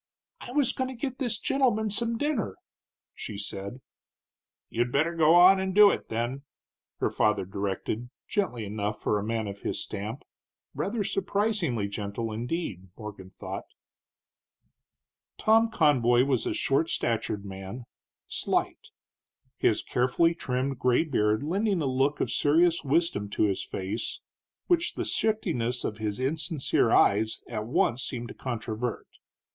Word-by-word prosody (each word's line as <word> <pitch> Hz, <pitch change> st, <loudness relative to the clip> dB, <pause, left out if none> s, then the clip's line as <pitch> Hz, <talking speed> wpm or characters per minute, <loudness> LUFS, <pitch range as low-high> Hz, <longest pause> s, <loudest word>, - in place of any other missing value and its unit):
"I -, -, -8 dB
was 280 Hz, -2 st, +2 dB
goin' 260 Hz, -, -1 dB
to 260 Hz, -, -7 dB
get 255 Hz, +1 st, -4 dB
this 240 Hz, -6 st, 0 dB
gentleman 220 Hz, -4 st, +1 dB
some 230 Hz, +2 st, 0 dB
dinner," 255 Hz, -, -1 dB, 0.6 s
she 105 Hz, -, -6 dB
said. 100 Hz, +4 st, -5 dB, 0.9 s
"You'd 120 Hz, +1 st, -1 dB
better 155 Hz, +6 st, +2 dB
go 165 Hz, 0 st, +5 dB
on 185 Hz, +2 st, +8 dB
and 190 Hz, 0 st, -2 dB
do 205 Hz, -1 st, +9 dB
it, -, -, -4 dB
then," 120 Hz, +4 st, -2 dB, 0.6 s
her -, -, 0 dB
father 105 Hz, -3 st, +2 dB
directed, 100 Hz, +4 st, -3 dB, 0.2 s
gently 125 Hz, -, -1 dB
enough 105 Hz, +1 st, -3 dB
for 105 Hz, -, +1 dB
a -, -, -4 dB
man 110 Hz, 0 st, -2 dB
of 100 Hz, 0 st, -6 dB
his -, -, -3 dB
stamp, 105 Hz, +6 st, -5 dB, 0.5 s
rather 230 Hz, -3 st, -1 dB
surprisingly 195 Hz, -, 0 dB
gentle, 100 Hz, +2 st, -4 dB
indeed, 115 Hz, -, -4 dB
Morgan 105 Hz, -4 st, -8 dB
thought. 95 Hz, -, -7 dB, 1.7 s
Tom 225 Hz, +1 st, +4 dB
Conboy 130 Hz, -, +4 dB
was 130 Hz, -3 st, 0 dB
a -, -, 0 dB
short 140 Hz, +4 st, +2 dB
statured 110 Hz, -3 st, -1 dB
man, 95 Hz, +5 st, -7 dB, 0.4 s
slight; -, -, -1 dB, 0.7 s
his -, -, +2 dB
carefully 130 Hz, +7 st, +2 dB
trimmed 130 Hz, -4 st, -2 dB
gray 125 Hz, +4 st, +3 dB
beard 110 Hz, -7 st, +1 dB
lending 195 Hz, +4 st, +1 dB
a 155 Hz, -, -1 dB
look 135 Hz, +2 st, +1 dB
of -, -, 0 dB
serious 165 Hz, +3 st, +3 dB
wisdom 140 Hz, -8 st, +1 dB
to 105 Hz, -, 0 dB
his 100 Hz, -3 st, +1 dB
face 100 Hz, +4 st, -4 dB, 0.5 s
which 350 Hz, -2 st, +1 dB
the -, -, -2 dB
shiftiness 145 Hz, -, 0 dB
of 105 Hz, -, -3 dB
his 105 Hz, +1 st, -2 dB
insincere 145 Hz, -2 st, +1 dB
eyes 110 Hz, +2 st, +3 dB
at 110 Hz, -2 st, -4 dB
once 120 Hz, 0 st, +1 dB
seemed 120 Hz, -2 st, -4 dB
to -, -, -7 dB
controvert. 115 Hz, -1 st, -4 dB
125 Hz, 140 wpm, -28 LUFS, 110-175 Hz, 1.7 s, do